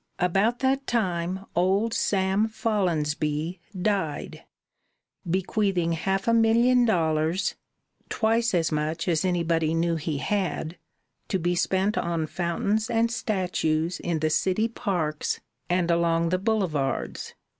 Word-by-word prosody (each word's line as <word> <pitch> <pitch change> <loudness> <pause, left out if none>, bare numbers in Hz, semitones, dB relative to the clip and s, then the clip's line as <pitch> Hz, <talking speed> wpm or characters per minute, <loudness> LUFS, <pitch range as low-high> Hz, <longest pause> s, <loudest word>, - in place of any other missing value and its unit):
About 195 +7 +2
that 270 +1 +1
time 185 -4 -1
old 195 +6 +2
Sam 195 +1 +1
Follonsby 165 -7 -1 0.2
died, 190 -6 -2 0.9
bequeathing 185 -1 0
half 190 +5 -1
a 230 - +4
million 235 +2 +4
dollars 160 -3 +1 0.6
twice 225 -1 +1
as 165 -2 +1
much 155 +3 -2
as 165 -1 +2
anybody 165 -3 +1
knew 165 0 +1
he 155 -1 -3
had 175 -1 -2 0.5
to 190 - 0
be 175 0 0
spent 190 +4 +1
on 170 -2 -1
fountains 190 +7 -1
and 230 0 +2
statues 180 -7 -1
in 165 -3 -2
the 155 0 +1
city 190 +7 +1
parks 180 -10 -2 0.3
and 175 -1 +2
along 170 0 +2
the 185 +1 +1
boulevards. 180 -10 -1
180 Hz, 120 wpm, -26 LUFS, 165-210 Hz, 0.9 s, a